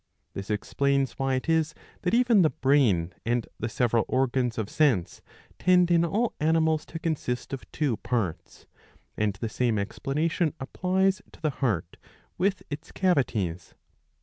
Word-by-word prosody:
This 100 +1 -6
explains 140 +6 0
why 135 -1 +1
it 130 - -3
is 160 -1 +1 0.3
that 180 +4 +1
even 240 -4 +5
the 160 - +5
brain 125 - +2
and 120 0 0
the 115 - -2
several 120 -2 +2
organs 130 -2 0
of 110 -3 -1
sense 125 - +1 0.4
tend 180 -1 +4
in 170 -1 +5
all 215 +8 0
animals 160 0 +2
to 165 - -6
consist 150 -7 -3
of 135 - -7
two 140 -8 0
parts; 90 -9 -3 0.5
and 105 -1 0
the 115 +3 -4
same 115 0 0
explanation 150 - -1
applies 185 +8 0
to - - -16
the 155 -2 0
heart 105 - -2 0.4
with 195 +1 +1
its 150 +3 -6
cavities. 110 - 0
135 Hz, 150 wpm, -27 LUFS, 115-165 Hz, 0.5 s, even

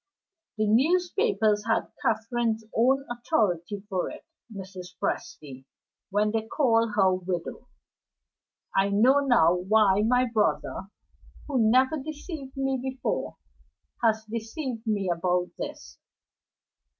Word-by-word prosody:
The 215 - +1
newspapers 280 - +2
had 225 - 0
Catherine's 225 -1 0
own 265 +4 +3
authority 205 - -1
for 185 -4 -2
it, - - -11 0.3
Mrs. 190 -3 -9
Presty, 135 -3 -4 0.4
when 210 +1 +1
they 220 0 -2
called 230 -5 +2
her 190 -2 +4
widow. 180 -2 -4 1.1
I 195 +1 +3
know 240 +8 +4
now 240 - +4
why 195 +2 +3
my 250 +3 +3
brother, 215 -4 -1 0.6
who 250 -7 +2
never 260 +6 +3
deceived 295 -1 -8
me 270 -1 0
before, 265 0 -3 0.7
has 220 -1 +2
deceived 230 +2 -5
me 205 -3 0
about 180 +1 0
this. - - -7
220 Hz, 110 wpm, -27 LUFS, 195-260 Hz, 1.1 s, her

